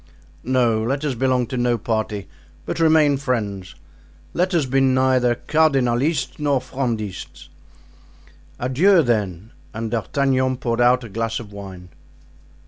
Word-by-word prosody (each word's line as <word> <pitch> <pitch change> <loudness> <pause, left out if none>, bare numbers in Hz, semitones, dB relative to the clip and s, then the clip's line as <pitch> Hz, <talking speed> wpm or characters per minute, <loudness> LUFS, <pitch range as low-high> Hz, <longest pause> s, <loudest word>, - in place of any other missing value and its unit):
"No, 120 -3 +2
let 135 +6 -2
us 145 - 0
belong 125 0 +1
to 125 +2 -5
no 120 -1 +1
party, 110 -2 -3 0.4
but - - -4
remain 155 -3 +4
friends; 105 - -3 0.6
let 180 +2 0
us 160 -4 +2
be 135 +1 +1
neither 130 -2 +3
Cardinalists 135 -1 +1
nor 145 -2 +1
Frondists." 120 -7 -5 1.1
"Adieu, 165 +9 +4
then." 105 -4 -2 0.2
And 110 0 -4
D'Artagnan 130 +2 0
poured 120 -1 -1
out 125 +1 +4
a - - -7
glass 115 +2 -2
of 105 -3 -11
wine. 95 -3 -10
125 Hz, 130 wpm, -21 LUFS, 115-135 Hz, 1.1 s, remain